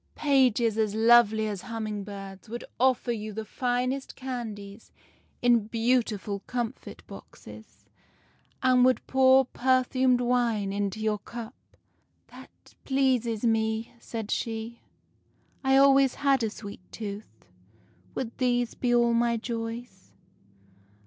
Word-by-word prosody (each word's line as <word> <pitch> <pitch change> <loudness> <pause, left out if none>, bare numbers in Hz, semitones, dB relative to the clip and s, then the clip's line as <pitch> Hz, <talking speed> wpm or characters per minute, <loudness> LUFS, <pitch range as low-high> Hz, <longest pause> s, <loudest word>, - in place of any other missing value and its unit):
" - - -42
' - - -42
Pages 250 -6 +2
as 215 -1 0
lovely 220 -1 +5
as 205 -3 -4
humming 215 -3 -5
birds 195 0 -9
would 240 +2 -6 0.2
offer 255 -1 +2
you 215 -2 -4
the 220 +2 -4
THE - - -15
SLEEPING - - -25
BEAUTY 255 - -1
19 245 +1 +1
finest 270 0 -6
candies 220 -5 -7 0.5
in 235 -3 +4
beautiful 225 -3 0
comfit 240 0 -5
boxes, - - -13 0.8
and 255 -1 +5
would 255 0 +3
pour 265 0 +5
per 255 +1 +2
fumed 255 -1 +2
wine 235 -5 0
into 200 0 -2
your 215 -1 0
cup.' 235 +3 -11
" - - -43
' - - -44
That - - -16
pleases 255 -5 +1
me,' 220 0 0
said 225 -3 -6
she. 225 +1 -3 0.4
' - - -40
I 265 0 +4
always 275 -1 +5
had 275 -2 +2
a 225 - 0
sweet 205 -3 -9
tooth. 200 - -8 0.7
Would 235 -3 -4
these 245 -2 +1
be 245 -1 0
all 235 0 +3
my 235 0 +2
joys? 230 -3 -6
235 Hz, 145 wpm, -27 LUFS, 215-250 Hz, 0.8 s, lovely